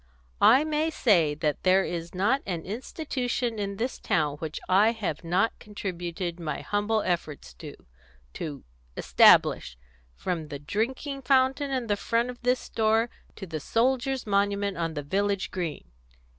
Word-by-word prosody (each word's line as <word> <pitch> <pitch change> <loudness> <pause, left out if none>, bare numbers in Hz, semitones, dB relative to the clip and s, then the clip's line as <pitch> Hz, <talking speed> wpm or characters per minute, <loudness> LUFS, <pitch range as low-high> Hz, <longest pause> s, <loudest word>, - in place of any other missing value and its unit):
"I 265 +5 +7
may 310 +1 0
say 175 - +3
that 150 -2 -1
there 190 +1 +4
is 170 0 -5
not 230 +9 +2
an 170 -4 -3
institution 245 - -3
in 200 -1 -3
this 245 +6 -3
town 155 -8 0
which 155 0 -5
I 205 +5 +4
have 190 -10 -4
not 180 +6 +1
contributed 180 -4 -5
my 155 -4 -4
humble 210 +1 0
efforts 155 - -3
to - - -8 0.6
to 145 -3 -6 0.3
establish, - - +5 0.4
from 165 - -3
the 145 -1 -6
drinking 245 - -3
fountain 270 +1 +2
in 255 -3 -2
front 230 +4 0
of 245 - -14
this 250 0 +2
store, 225 +1 +1 0.2
to 195 - -7
the 160 -3 -5
soldiers' 255 - 0
monument 200 -1 +1
on 165 -2 -3
the 145 - -3
village 200 +5 -1
green." 170 -5 -4
200 Hz, 145 wpm, -27 LUFS, 170-245 Hz, 0.6 s, I